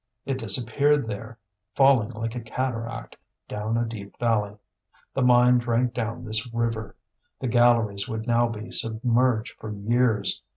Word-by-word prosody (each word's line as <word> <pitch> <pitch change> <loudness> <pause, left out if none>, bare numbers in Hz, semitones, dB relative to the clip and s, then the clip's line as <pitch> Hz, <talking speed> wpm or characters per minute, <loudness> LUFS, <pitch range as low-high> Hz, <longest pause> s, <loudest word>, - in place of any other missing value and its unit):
It 135 -1 -2
disappeared 125 +6 +2
there, 110 +2 -6 0.4
falling 135 -6 +4
like 115 -1 -4
a 125 - -4
cataract 115 0 -4 0.3
down 105 +2 -2
a 120 - +1
deep 105 -3 -8
valley. 105 -3 0 0.6
The 135 - -1
mine 125 0 +5
drank 120 +1 0
down 115 -1 -4
this 110 +2 -2
river; 115 -2 -2 0.4
the 130 - -2
galleries 120 -3 +3
would 110 -1 -4
now 120 0 +3
be 110 0 -7
submerged 115 +1 0
for 110 - -7
years. 110 0 +1
115 Hz, 140 wpm, -25 LUFS, 110-125 Hz, 0.6 s, mine